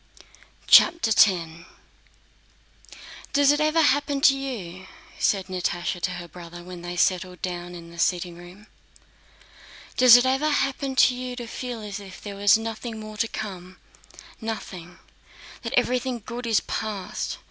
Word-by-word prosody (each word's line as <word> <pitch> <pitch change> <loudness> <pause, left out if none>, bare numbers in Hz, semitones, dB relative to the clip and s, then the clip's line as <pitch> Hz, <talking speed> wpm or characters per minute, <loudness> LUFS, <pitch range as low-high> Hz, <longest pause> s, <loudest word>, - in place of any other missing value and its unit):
CHAPTER 335 -9 +6
X 215 - +7 2.1
"Does 285 0 +5
it 295 - +1
ever 310 +1 +3
happen 285 0 +2
to 275 -1 +6
you," 190 -10 -6 0.3
said 195 -2 +1
Natásha 180 -1 -3
to 180 - -1
her 175 -1 -7
brother, 175 +1 -11
when 180 -1 -9
they 175 0 -6
settled 180 0 0
down 175 -1 -5
in 170 -1 -11
the 170 - -12
sitting 175 0 0
room, 175 +4 -14 1.3
"does 250 -2 +9
it 245 - +2
ever 270 +4 +1
happen 275 -2 -1
to 260 - +5
you 250 0 -5
to 245 -1 -6
feel 240 0 -6
as 205 -1 -6
if 195 -2 -11
there 205 -1 -8
were 205 +1 -7
nothing 225 0 -6
more 215 0 -9
to 230 - +1
come—nothing; 185 -1 -9 0.6
that - - -5
everything 250 -2 0
good 240 +1 -6
is 220 -5 +3
past? 205 -4 -4
215 Hz, 145 wpm, -24 LUFS, 180-255 Hz, 2.1 s, does